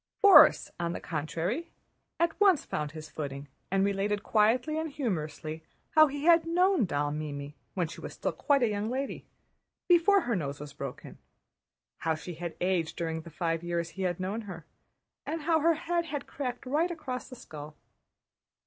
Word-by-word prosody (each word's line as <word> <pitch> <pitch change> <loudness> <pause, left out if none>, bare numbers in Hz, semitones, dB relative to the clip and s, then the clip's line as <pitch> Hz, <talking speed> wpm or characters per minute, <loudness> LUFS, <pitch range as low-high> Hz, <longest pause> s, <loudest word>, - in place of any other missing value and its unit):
Borís 400 -1 +8
on 170 0 -1
the - - -4
contrary 170 - -3 0.5
at 340 0 +3
once 380 -8 +5
found 150 -1 -3
his 155 -1 -9
footing, 140 -2 -5 0.2
and 195 +1 +2
related 200 +1 0
quietly 245 +8 +2
and 320 0 -2
humorously 160 - -3 0.3
how 310 0 +7
he 285 +1 -5
had 335 -1 +6
known 365 +2 +3
that 220 - +2
doll 145 -2 0
Mimi 145 -1 -5 0.2
when 180 -4 0
she - - -10
was - - -7
still - - -1
quite 280 -3 +2
a - - +4
young 210 0 -2
lady, 270 +3 -4 0.6
before 365 +3 +5
her 240 -7 -1
nose 145 -5 -3
was 145 -1 -8
broken; 140 -3 -8 0.8
how 160 -1 0
she 175 +3 -7
had 170 +1 -6
aged 180 -3 0
during 160 -1 -3
the 170 - -11
five 165 0 -1
years 170 -1 -2
he 195 - -7
had 180 -2 -1
known 195 +5 -2
her, 170 -4 -8 0.6
and 320 -1 -4
how 325 +1 +3
her 330 +2 +3
head 340 +2 -1
had 295 -3 -4
cracked 250 -3 -5
right 305 +7 +1
across 265 -8 -5
the 255 - -9
skull. 150 -8 -10
195 Hz, 180 wpm, -29 LUFS, -, 0.8 s, Borís